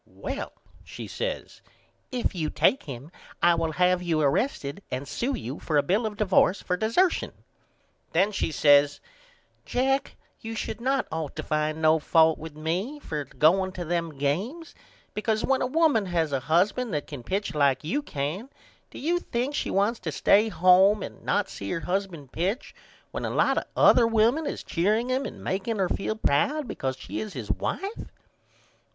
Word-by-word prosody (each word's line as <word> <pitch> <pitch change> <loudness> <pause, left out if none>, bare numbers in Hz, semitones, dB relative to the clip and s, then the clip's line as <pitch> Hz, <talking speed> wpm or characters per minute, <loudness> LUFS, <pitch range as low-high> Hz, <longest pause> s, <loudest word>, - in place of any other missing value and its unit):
Well, - - -6 0.3
she - - -8
says, - - -5 0.5
if 250 -4 -1
you 160 -5 -2
take 270 - +2
him 135 +3 -9 0.3
I 175 - +5
will 165 -1 -1
have 180 +1 +3
you 170 -3 0
arrested 155 - 0
and 135 +2 -4
sew 265 +3 -2
you 140 - -6
for 155 - 0
a 145 - +4
bill 210 +5 +1
of 210 -1 -7
divorce 195 -2 +3
for 180 - -1
dessertion. 230 - +1 0.8
Then 190 +5 +3
she 195 - -1
says 145 -1 +4 0.6
Jack 270 +2 0 0.2
you 225 0 -6
should 225 - -4
not 265 +2 +1
ought 160 -2 -4
to 155 - -4
find 155 +1 -1
no 160 0 +5
fault 160 +1 +4
with 160 -1 -8
me 175 - -2
for 150 - -4
going 185 +7 +2
to 175 -2 -5
them 165 -3 -2
games 200 - -2 0.4
because 215 +1 -1
when 270 0 +1
a 255 - +1
woman 290 - +2
has 165 -4 0
a 135 - 0
husband 190 - +1
that 145 - -2
can 145 -5 -8
pitch 190 - -2
like 140 -2 +2
you 185 - -1
can 170 - -4 0.4
do - - -12
you 345 +5 0
think 250 -1 -2
she - - -2
wants 205 +4 +1
to 165 -4 -4
stay 210 +8 +4
home 190 +2 +5
and - - -9
not - - +1
see 100 - -7
her 165 - -2
husband 180 -7 -3
pitch 195 - -2 0.4
when - - -4
a - - -1
lot - - +2
of - - -9
other 235 - +6
women 230 +7 +2
is - - -4
cheering 215 +8 0
him 260 +2 0
and - - -10
makeing 200 +4 -2
her 190 -2 +1
feel 215 - -2
proud 275 - +1
because 130 - -3
she - - -6
is 215 -2 -5
his - - -4
wife? 400 +3 -4
185 Hz, 180 wpm, -26 LUFS, 155-230 Hz, 0.8 s, other